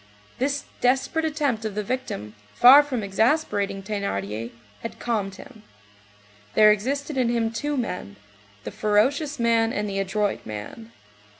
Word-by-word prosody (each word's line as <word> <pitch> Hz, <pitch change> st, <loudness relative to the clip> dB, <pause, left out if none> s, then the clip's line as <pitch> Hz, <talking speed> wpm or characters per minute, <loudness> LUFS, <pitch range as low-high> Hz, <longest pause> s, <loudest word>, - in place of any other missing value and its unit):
This 280 Hz, +2 st, 0 dB, 0.2 s
desperate 265 Hz, +6 st, +1 dB
attempt 285 Hz, -7 st, -1 dB
of 215 Hz, -2 st, -4 dB
the 210 Hz, -, -1 dB
victim, 200 Hz, -, -4 dB, 0.2 s
far 260 Hz, +4 st, +9 dB
from 260 Hz, -6 st, -3 dB
exasperating 200 Hz, -2 st, 0 dB
Thénardier, 115 Hz, -, -3 dB, 0.3 s
had 230 Hz, -, -6 dB
calmed 205 Hz, -5 st, -2 dB
him. 220 Hz, +2 st, -13 dB, 0.9 s
There 215 Hz, 0 st, +7 dB
existed 275 Hz, +7 st, -2 dB
in 250 Hz, -2 st, +2 dB
him 230 Hz, -1 st, 0 dB
two 290 Hz, +5 st, -2 dB
men, 180 Hz, -, -4 dB, 0.5 s
the -, -, -6 dB
ferocious 270 Hz, +8 st, +1 dB
man 230 Hz, -1 st, +2 dB
and 210 Hz, -2 st, -2 dB
the 195 Hz, -1 st, -3 dB
adroit 195 Hz, +1 st, -1 dB
man. 110 Hz, -, -8 dB
225 Hz, 135 wpm, -24 LUFS, 200-265 Hz, 0.9 s, far